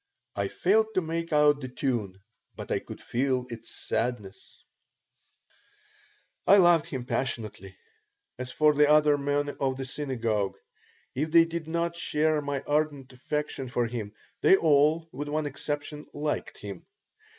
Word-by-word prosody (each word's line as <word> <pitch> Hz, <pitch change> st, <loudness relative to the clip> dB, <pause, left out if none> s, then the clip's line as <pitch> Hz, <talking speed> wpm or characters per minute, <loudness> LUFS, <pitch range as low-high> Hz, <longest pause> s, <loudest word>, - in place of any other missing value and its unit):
I 100 Hz, 0 st, 0 dB
failed 220 Hz, -, +2 dB
to 185 Hz, -, +3 dB
make 165 Hz, 0 st, -3 dB
out 150 Hz, -1 st, +4 dB
the 130 Hz, -, -4 dB
tune, 115 Hz, -8 st, -3 dB, 0.3 s
but -, -, -8 dB
I -, -, +1 dB
could -, -, -10 dB
feel 130 Hz, 0 st, -1 dB
its 115 Hz, -2 st, -8 dB
sadness 105 Hz, -5 st, -4 dB, 1.8 s
I 200 Hz, -, +8 dB
loved 175 Hz, -4 st, +5 dB
him 130 Hz, -3 st, -5 dB
passionately. 115 Hz, -6 st, -4 dB, 0.6 s
As 125 Hz, 0 st, -5 dB
for 150 Hz, -1 st, +4 dB
the 150 Hz, 0 st, +4 dB
other 150 Hz, -1 st, +5 dB
men 145 Hz, 0 st, -1 dB
of 130 Hz, -1 st, 0 dB
the 135 Hz, -, -4 dB
synagogue, 115 Hz, -8 st, -2 dB, 0.6 s
if 150 Hz, +5 st, -1 dB
they 165 Hz, +1 st, +6 dB
did 165 Hz, -1 st, -5 dB
not 170 Hz, +1 st, -1 dB
share 155 Hz, -2 st, +1 dB
my 140 Hz, -1 st, -3 dB
ardent 145 Hz, -3 st, -1 dB
affection 135 Hz, 0 st, -4 dB
for 120 Hz, -1 st, 0 dB
him, 115 Hz, -3 st, -5 dB, 0.3 s
they -, -, +7 dB
all, 155 Hz, +1 st, +3 dB
with 145 Hz, +3 st, -5 dB
one 155 Hz, +1 st, -1 dB
exception, 145 Hz, +1 st, -4 dB
liked 150 Hz, +1 st, -3 dB
him. 100 Hz, -3 st, -8 dB
145 Hz, 145 wpm, -28 LUFS, 125-155 Hz, 1.8 s, I